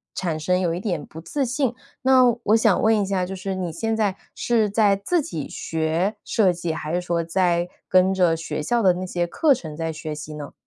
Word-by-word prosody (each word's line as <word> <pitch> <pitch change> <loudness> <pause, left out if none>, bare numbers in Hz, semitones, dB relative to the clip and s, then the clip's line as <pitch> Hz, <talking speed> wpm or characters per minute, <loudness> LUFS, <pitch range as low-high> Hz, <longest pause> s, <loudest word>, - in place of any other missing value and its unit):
产 165 -4 -2
生 180 +4 +1
有 170 -2 0
一 175 - -3
点 175 -8 -3
不 160 - -11
自 275 - -2
信。 255 -1 -1 0.3
那 260 -1 +6 0.2
我 215 - +4
想 220 -4 +3
问 220 0 +4
一 - - 0
下， 190 -2 0
就 190 +1 -6
是 190 0 -4
你 175 -3 -3
现 225 +5 -2
在 205 -3 +1 0.2
是 225 -3 +1
在 205 -1 +3
自 320 - 0
己 160 - -5
学 165 +6 -1
设 190 -5 +2
计， 170 -1 -3
还 155 0 -4
是 180 - +1
说 170 -1 -1
在 175 0 +1 0.2
跟 185 +1 +4
着 175 -3 +2
学 155 -2 -4
校 240 +7 +1
的 185 -3 +5
那 185 +1 -4
些 175 -1 -2
课 295 - +3
程 160 -11 -6
在 165 +1 -3
学 155 -1 -6
习 150 +1 -8
呢？ 145 -1 -8
180 Hz, 240 characters per minute, -23 LUFS, 165-215 Hz, 0.3 s, 那